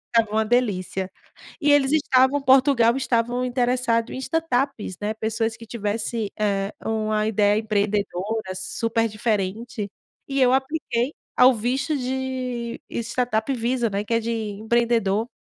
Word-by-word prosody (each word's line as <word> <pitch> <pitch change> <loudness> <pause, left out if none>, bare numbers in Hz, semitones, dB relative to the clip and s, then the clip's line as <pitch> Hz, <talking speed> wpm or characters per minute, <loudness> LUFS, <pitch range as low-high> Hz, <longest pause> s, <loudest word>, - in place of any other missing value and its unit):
estava 225 -2 +3
uma 220 0 +1
delícia. 195 -5 0 0.5
E 290 0 +4
eles 280 -1 +4
estavam 275 -2 +3
Portugal 260 -3 +5
estavam 245 0 0
interessado 245 -2 +1
em - - -5
startups, 265 - -1
né. 210 +1 -1
Pessoas 225 +1 -1
que 230 - -11
tivesse, 215 0 -2
eh, 200 -1 0
uma 215 -1 0
ideia 210 -1 +3
empreendedora 205 -1 -1
super 230 +4 -1
diferente. 215 +1 -2 0.4
E 275 -1 0
eu 250 -1 +5
apliquei 265 -2 -1 0.2
ao 255 +1 +7
visto 260 +7 -1
de 255 -2 -3
Startup 240 0 -1
Visa, 240 -1 0
né, 200 +1 -2
que 230 - -2
é - - +3
de 230 +1 -2
empreendedor. 220 0 0
230 Hz, 130 wpm, -23 LUFS, 215-255 Hz, 0.5 s, ao